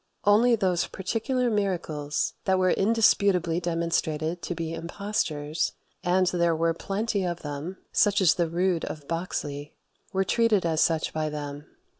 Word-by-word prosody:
Only 225 +4 +5
those 185 -5 +1
particular 240 +5 -1
miracles 170 -8 -1
that 190 -1 +3
were 185 -1 +3
indisputably 195 -5 +3
demonstrated 165 -1 -1
to 175 - -4
be 165 0 -4
impostures 165 -3 -2 0.3
and 185 +1 +3
there 170 -2 +2
were 165 +1 +1
plenty 200 +3 -2
of 175 -1 -3
them, 150 +5 -5
such 205 0 +3
as 180 -4 +5
the 170 -2 0
Rood 175 0 0
of 150 -3 -7
Boxley 150 -4 -4 0.4
were 190 0 +1
treated 215 -1 +2
as 160 -1 +1
such 165 -1 +1
by 155 -1 -1
them. 145 0 -6
175 Hz, 145 wpm, -26 LUFS, 160-195 Hz, 0.4 s, Only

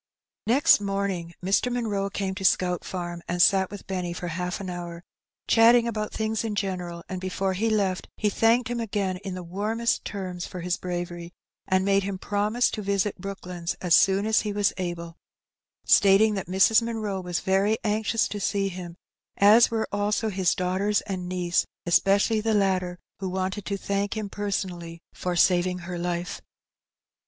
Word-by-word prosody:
Next 245 -2 +5
morning 195 -4 -2
Mr. 200 +6 +2
Munroe 210 -5 -1
came 195 -1 -3
to 190 0 -7
Scout 180 -2 +2
Farm 175 -2 -5
and 175 +1 -2
sat 190 +1 +4
with 205 -1 -9
Benny 180 -2 -3
for 175 0 -5
half 180 +2 -3
an 195 - -6
hour, 175 -1 -6 0.4
chatting 235 +1 +6
about 215 -2 -3
things 220 0 -2
in 220 -2 -3
general, 180 -4 -3
and 185 -1 -5
before 190 +1 -1
he 220 +5 0
left 195 -4 0
he 210 - 0
thanked 225 +4 +3
him 240 0 -3
again 200 -4 -2
in 190 -1 -6
the 180 - -6
warmest 210 +6 -1
terms 185 -3 -5
for 180 - -7
his 175 0 0
bravery, 175 -1 -5 0.3
and 185 0 +2
made 200 0 +3
him 195 0 -4
promise 210 +5 0
to 215 - -4
visit 200 0 -1
Brooklands 180 -3 -5
as 175 -2 +3
soon 195 +1 +4
as 220 0 +3
he 210 - -3
was 205 0 +1
able, 170 -2 -5 0.7
stating 205 +2 +5
that 195 -4 -4
Mrs. 195 +5 +4
Munroe 215 -4 -3
was 180 -1 -2
very 195 +3 +2
anxious 220 +1 +1
to 205 - -4
see 195 0 0
him, 175 -2 -8 0.4
as 215 +4 +7
were 225 -1 -1
also 205 +2 0
his 190 -3 +1
daughters 190 +3 0
and 185 -3 -5
niece, 175 -1 0 0.2
especially 200 +5 +3
the 220 0 +1
latter, 185 -3 +1 0.2
who 190 -1 -3
wanted 190 +1 -3
to 200 +1 -2
thank 200 +2 -2
him 210 -2 -3
personally 180 -5 -4
for 180 -1 -3
saving 180 +1 +3
her 175 0 -6
life. 175 +1 -3
195 Hz, 175 wpm, -26 LUFS, 180-210 Hz, 0.7 s, as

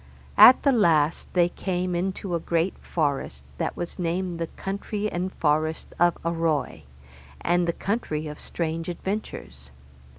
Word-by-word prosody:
At 255 - +9
the 280 - +5
last 165 - +2
they 175 -1 +4
came 180 0 -2
into 185 +1 -2
a 170 - +1
great 170 +3 0
forest, 140 - -2 0.2
that - - -2
was 175 +2 -5
named 175 0 -2
the 165 - -2
country 200 +3 -4
and 180 +2 -2
forest 155 +1 0
of 175 0 +4
Arroy, 165 - -1 0.6
and 175 0 +2
the 170 - +1
country 180 -8 -2
of 150 0 -7
strange 165 0 -3
adventures. 175 - -5
170 Hz, 140 wpm, -25 LUFS, 160-185 Hz, 0.6 s, At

